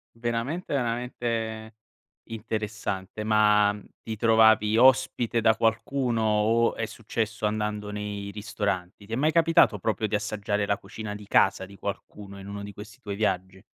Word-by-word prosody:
Veramente, 120 Hz, +8 st, -3 dB
veramente 115 Hz, -3 st, -2 dB, 0.5 s
interessante. 110 Hz, -2 st, -4 dB
Ma, 105 Hz, -1 st, +4 dB, 0.3 s
ti 110 Hz, -, -5 dB
trovavi 110 Hz, -1 st, +4 dB
ospite 125 Hz, -2 st, +4 dB
da 110 Hz, 0 st, +4 dB
qualcuno 115 Hz, +1 st, 0 dB
o 110 Hz, +2 st, +2 dB
è 115 Hz, -, -2 dB
successo 110 Hz, -1 st, -3 dB
andando 105 Hz, -1 st, -2 dB
nei 105 Hz, -1 st, -5 dB
ristoranti? 100 Hz, -2 st, -4 dB
Ti 110 Hz, -, -11 dB
è -, -, -1 dB
mai 155 Hz, +4 st, +2 dB
capitato, 165 Hz, -10 st, +4 dB
proprio 110 Hz, +2 st, -1 dB
di 105 Hz, -, -4 dB
assaggiare 105 Hz, -1 st, -1 dB
la 100 Hz, -, +1 dB
cucina 105 Hz, +1 st, -7 dB
di 105 Hz, -1 st, -10 dB
casa 95 Hz, -1 st, +3 dB
di 100 Hz, +1 st, -13 dB
qualcuno, 100 Hz, 0 st, -7 dB
in 95 Hz, -, -10 dB
uno 100 Hz, 0 st, -6 dB
di 100 Hz, -1 st, -8 dB
questi 110 Hz, +4 st, -11 dB
tuoi 100 Hz, -5 st, -5 dB
viaggi? 95 Hz, -2 st, -2 dB
110 Hz, 150 wpm, -26 LUFS, 105-115 Hz, 0.5 s, Ma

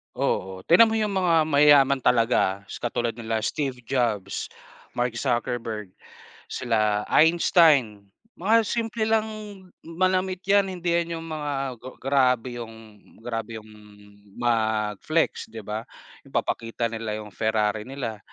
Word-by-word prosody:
Oo, 95 Hz, 0 st, -2 dB
tignan 205 Hz, +7 st, +8 dB
mo 220 Hz, -, -1 dB
yung 215 Hz, -1 st, 0 dB
mga 170 Hz, -3 st, +3 dB
mayayaman 145 Hz, -2 st, +5 dB
talaga. 115 Hz, -6 st, +2 dB
S -, -, -6 dB
katulad 120 Hz, -1 st, -2 dB
nila 110 Hz, -1 st, -2 dB
Steve 130 Hz, -1 st, -2 dB
Jobs, 115 Hz, -6 st, -1 dB, 0.5 s
Mark 120 Hz, -1 st, -1 dB
Zuckerberg, 115 Hz, -5 st, -2 dB, 0.6 s
sila 110 Hz, -4 st, 0 dB
Einstein, 150 Hz, -, +4 dB, 0.3 s
mga 220 Hz, +5 st, +3 dB
simple 225 Hz, -1 st, -1 dB
lang 220 Hz, 0 st, +2 dB, 0.6 s
manamit 185 Hz, +2 st, 0 dB
yan, 200 Hz, 0 st, +3 dB
hindi 175 Hz, -2 st, -3 dB
yan 170 Hz, 0 st, 0 dB
yung 165 Hz, -, -6 dB
mga, 150 Hz, -2 st, -3 dB, 0.5 s
grabe 125 Hz, -3 st, +1 dB
yung 110 Hz, -2 st, -11 dB, 0.2 s
grabe 115 Hz, -1 st, -4 dB
yung 110 Hz, 0 st, -10 dB, 0.7 s
mag-flex, 110 Hz, +5 st, 0 dB
'di 110 Hz, -1 st, -9 dB
ba? 105 Hz, +2 st, -5 dB, 0.4 s
Yung -, -, -16 dB
papakita 115 Hz, 0 st, -1 dB
nila 110 Hz, -1 st, -4 dB
yung 105 Hz, -1 st, -8 dB
Ferrari 110 Hz, +1 st, -1 dB
nila, 120 Hz, -6 st, -5 dB
120 Hz, 125 wpm, -25 LUFS, 110-165 Hz, 0.7 s, tignan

